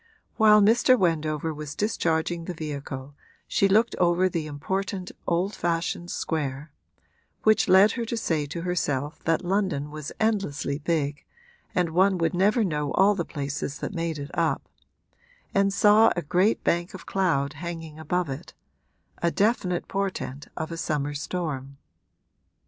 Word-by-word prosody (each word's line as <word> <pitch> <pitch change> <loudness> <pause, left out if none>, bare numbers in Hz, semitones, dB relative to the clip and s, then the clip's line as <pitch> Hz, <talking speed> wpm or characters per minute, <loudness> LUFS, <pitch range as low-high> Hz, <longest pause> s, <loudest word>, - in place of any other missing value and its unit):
While 210 -2 +7
Mr. 240 +4 +5
Wendover 160 -4 0
was 150 -1 -7
discharging 170 -5 0
the 180 - -5
vehicle 145 -3 -6 0.3
she 200 - +3
looked 220 +4 +3
over 175 +1 +3
the 165 -4 -3
important 185 +5 -3 0.2
old 180 +4 +1
fashioned 170 0 -2
square 150 -3 -3 0.7
(which 215 0 +4
led 190 +3 +7
her 240 - -3
to 230 +1 -3
say 160 -9 -1
to 165 +4 -5
herself 150 -5 -2
that 165 +3 +1
London 180 -7 0
was 155 -1 -6
endlessly 195 -10 0
big 150 -2 -1 0.5
and 175 -2 +1
one 190 +3 +3
would 165 -2 0
never 210 +6 +3
know 150 -6 -1
all 195 +2 +5
the 185 -4 -2
places 145 -2 -4
that - - -5
made 165 -3 -2
it 140 0 -7
up) 165 -1 0 0.9
and 195 0 +3
saw 210 +3 +5
a 175 - -2
great 185 +8 +2
bank 175 +2 0
of - - -10
cloud 160 -8 0
hanging 165 -1 -7
above 175 +3 -1
it 135 0 -7 0.7
a 170 - +3
definite 190 -2 0
portent 190 -8 -3
of 160 +1 -4
a 165 - -5
summer 145 -3 -1
storm. 145 -3 -4
170 Hz, 150 wpm, -26 LUFS, 150-195 Hz, 0.9 s, While